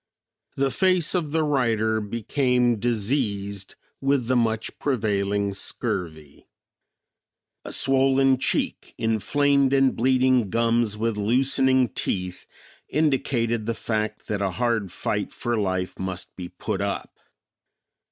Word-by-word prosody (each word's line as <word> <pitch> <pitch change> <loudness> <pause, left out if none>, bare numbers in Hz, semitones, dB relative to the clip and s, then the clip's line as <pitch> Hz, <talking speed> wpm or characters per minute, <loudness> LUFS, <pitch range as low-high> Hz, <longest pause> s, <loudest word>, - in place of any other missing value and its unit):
The 135 0 +1
face 185 -2 +2
of 165 -6 -1
the 160 0 +1
writer 115 -6 +1
became 120 +2 +1
diseased 100 -4 -2 0.3
with 135 -2 +1
the 130 +2 +1
much 115 -2 -1
prevailing 100 -5 0
scurvy. 80 -6 -5 1.2
A - - -7
swollen 135 0 +3
cheek, - - -1
inflamed 140 +5 +2
and 135 -1 +3
bleeding 130 -2 +3
gums 115 -1 +1
with 115 0 -1
loosening 130 +3 +2
teeth, 90 -1 -3 0.4
indicated 120 -7 0
the 115 - -1
fact 110 -1 -3
that 100 -1 -2
a 100 - +1
hard 115 -1 -1
fight - - -2
for 120 0 -2
life 95 -3 -2
must 95 -1 -5
be 90 -2 -7
put - - -4
up. - - -4
115 Hz, 115 wpm, -24 LUFS, 105-135 Hz, 1.2 s, swollen